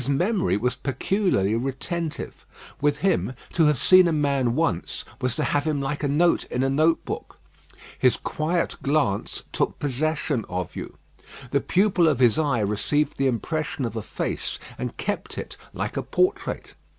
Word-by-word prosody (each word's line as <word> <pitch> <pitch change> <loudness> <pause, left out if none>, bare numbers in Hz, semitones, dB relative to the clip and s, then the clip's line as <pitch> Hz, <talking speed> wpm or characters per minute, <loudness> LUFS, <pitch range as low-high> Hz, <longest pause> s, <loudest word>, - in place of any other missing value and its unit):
His 125 - -4
memory 180 - +2
was 125 +4 0
peculiarly 135 - 0
retentive. 135 +6 -3 0.4
With 145 0 +2
him, 165 -8 +1 0.2
to 165 -3 +4
have 150 -2 +3
seen 185 +6 +6
a - - +2
man 140 -5 +1
once, 115 - -1 0.2
was 125 -1 0
to - - 0
have 145 0 +1
him 155 -2 0
like 140 +1 -2
a 145 - +1
note 165 +5 +3
in 125 - -1
a 135 - +1
note 155 +4 +2
book. - - -6 0.6
His 125 - +4
quiet 170 +3 -1
glance 140 -8 0
took - - 0
possession 145 -2 -1
of 90 -1 -4
you. - - -7 0.5
The 140 - +2
pupil 185 -1 +3
of 150 -5 +3
his 125 +2 +4
eye 140 -7 +1
received 130 +9 0
the 135 - +3
impression 145 +2 -1
of 115 -1 -4
a 110 - -2
face, - - -3 0.2
and 125 -1 -5
kept 205 - -3
it - - -5 0.2
like - - -4
a - - +1
portrait. 370 +3 -1
145 Hz, 170 wpm, -25 LUFS, 125-160 Hz, 0.6 s, seen